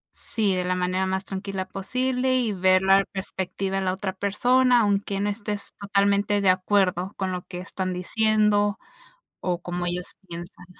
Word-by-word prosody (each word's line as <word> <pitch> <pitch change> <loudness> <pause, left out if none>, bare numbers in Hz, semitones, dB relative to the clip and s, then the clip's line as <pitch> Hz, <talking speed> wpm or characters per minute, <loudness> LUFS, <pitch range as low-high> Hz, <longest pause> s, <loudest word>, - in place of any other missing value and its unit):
Sí, 210 -4 0
de 180 - 0
la 180 0 0
manera 185 +1 0
más 190 +1 -2
tranquila 195 -1 -4
posible, 255 +6 0
y 240 -4 +1
ver 185 0 +3
la 195 +1 +5
perspectiva 190 0 -3
en 190 - -2
la 185 - +1
otra 190 0 -3
persona, 245 +6 +3
aunque 200 -1 0
no 205 - 0
estés 205 -1 -3
totalmente 200 +1 +2
de 195 -2 +3
acuerdo 185 0 +1
con 190 -1 -2
lo 180 -1 -3
que 180 - -7
están 185 0 -4
diciendo, 210 +2 +2 0.6
o 175 -1 -2
como 175 0 -3
ellos 175 0 -3
piensan. 175 +1 -9
195 Hz, 165 wpm, -25 LUFS, 185-205 Hz, 0.6 s, la